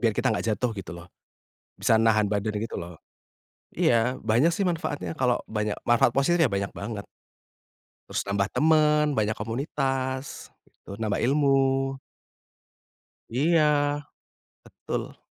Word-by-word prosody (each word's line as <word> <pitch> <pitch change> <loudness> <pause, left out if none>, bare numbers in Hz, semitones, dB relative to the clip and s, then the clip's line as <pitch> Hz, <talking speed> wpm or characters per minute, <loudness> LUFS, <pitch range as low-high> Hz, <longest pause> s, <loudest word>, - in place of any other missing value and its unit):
Biar 115 -2 +2
kita - - +1
enggak 105 - -2
jatuh 125 +2 -1
gitu 95 -3 -7
loh, 85 0 -11 0.7
bisa - - +3
nahan 110 -2 +3
badan 105 +1 -1
gitu 115 +2 -4
loh. 85 +1 -8 0.8
Iya 120 +3 +2
banyak 115 +9 +2
sih 200 - 0
manfaatnya 160 -2 -3
kalau 125 -2 +2
banyak 105 -1 -2
manfaat 120 0 +4
positif 155 +6 +2
ya - - +2
banyak 100 0 -2
banget. 100 0 -5 1.0
Terus - - -2
nambah 100 0 0
temen, 150 -1 +3
banyak 110 -2 0
komunitas, 130 +3 -3 0.3
terus 100 - -9
nambah 110 -2 -1
ilmu. 135 0 +2 1.4
Iya. 155 +7 +3 1.0
Betul. - - -6
120 Hz, 125 wpm, -26 LUFS, 105-140 Hz, 1.4 s, manfaat